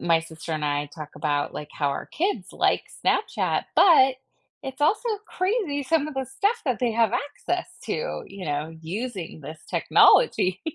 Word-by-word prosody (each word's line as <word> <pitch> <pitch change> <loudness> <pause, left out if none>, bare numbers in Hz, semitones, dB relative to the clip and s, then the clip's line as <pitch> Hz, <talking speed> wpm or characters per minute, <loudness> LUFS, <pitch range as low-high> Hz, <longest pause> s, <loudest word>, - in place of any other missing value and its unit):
my 165 -1 +3
sister 160 0 -8
and 155 -1 -2
I 145 0 0
talk 150 +1 -9
about, 145 -2 -1
like, 150 - -6
how 145 - 0
our 140 - -4
kids 385 +5 -2
like - - +1 0.2
Snapchat, - - +1
but 270 -8 +7 0.5
it's 265 0 -7
also 425 +10 +2 0.2
crazy 370 -7 -1
some 305 +1 +1
of 305 - -6
the 265 0 -1
stuff 405 +4 0
that 255 -4 +1
they 240 -3 +1
have 230 -1 +2
access 290 +6 -2 0.2
to, - - -3
you 195 -1 -9
know, 150 0 -2
using 190 -2 -5
this 155 +3 -9
technology, 185 - +4
230 Hz, 170 wpm, -25 LUFS, -, 0.5 s, but